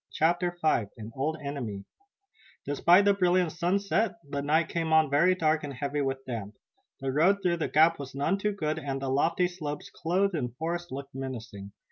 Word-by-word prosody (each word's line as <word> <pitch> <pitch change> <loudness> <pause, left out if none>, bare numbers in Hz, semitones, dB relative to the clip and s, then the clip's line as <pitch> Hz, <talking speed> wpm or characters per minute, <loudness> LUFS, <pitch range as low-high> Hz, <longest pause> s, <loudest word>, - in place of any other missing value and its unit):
CHAPTER 175 +3 +1
V 155 -9 +2
AN 110 0 -8
OLD 155 +4 -1
ENEMY 120 -9 -5 0.8
Despite 175 +7 +4
the 200 - +5
brilliant 180 -3 +2
sunset 195 +5 0
the 140 0 -3
night 155 +3 +2
came 165 -1 -2
on 160 -2 +4
very 170 +6 +4
dark 155 -3 +1
and 140 -2 -5
heavy 140 +3 -2
with 135 -1 -2
damp. 110 -4 -5 0.5
The 135 -1 -1
road 185 +8 +3
through 175 -2 +2
the 165 - -1
gap 160 +2 +4
was 135 -1 -8
none 165 +8 0
too 210 +1 0
good 155 -6 -2
and 135 -1 -3
the 135 -1 -3
lofty 145 +6 +2
slopes 155 -5 -6
clothed 185 +4 0
in 125 -7 -2
forest 170 +3 -3
looked 135 +1 -7
menacing. 115 -7 -7
155 Hz, 185 wpm, -28 LUFS, 135-175 Hz, 0.8 s, the